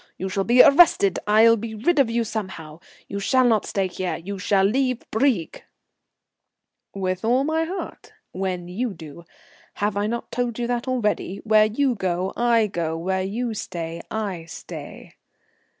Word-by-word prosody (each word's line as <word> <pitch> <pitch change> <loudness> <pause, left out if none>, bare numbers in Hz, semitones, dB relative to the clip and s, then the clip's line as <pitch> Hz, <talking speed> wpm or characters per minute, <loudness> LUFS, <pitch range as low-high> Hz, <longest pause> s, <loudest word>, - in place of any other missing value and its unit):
You 190 - -4
shall 195 +1 -1
be 245 +2 +7
arrested. 280 - +5
I'll 220 +2 +6
be 220 +1 -6
rid 290 +9 +1
of 265 -4 +4
you 230 0 0
somehow, 185 -8 -6 0.3
you 200 - -4
shall 255 +6 +2
not 225 -4 +2
stay 195 -1 0
here, 185 0 -3
you 195 +4 -7
shall 195 0 +2
leave 255 +4 +1
Brieg." 220 - 0 1.3
"With 185 -2 -3
all 245 +4 +2
my 320 +2 0
heart 370 +4 -7 0.2
when 185 -2 -3
you 205 +4 -3
do. 160 +1 -11 0.5
Have 205 0 -1
I 205 +1 0
not 235 +1 -4
told 245 -2 -2
you 240 - -2
that 240 +1 -2
already? 210 -6 -1
Where 215 -1 +5
you 255 +5 +1
go 185 -3 -2
I 235 -2 +3
go, 170 -5 -3
where 190 +3 -1
you 225 +5 -3
stay 170 -4 -5
I 200 -6 -4
stay." 165 - -10
210 Hz, 165 wpm, -23 LUFS, 185-240 Hz, 1.3 s, be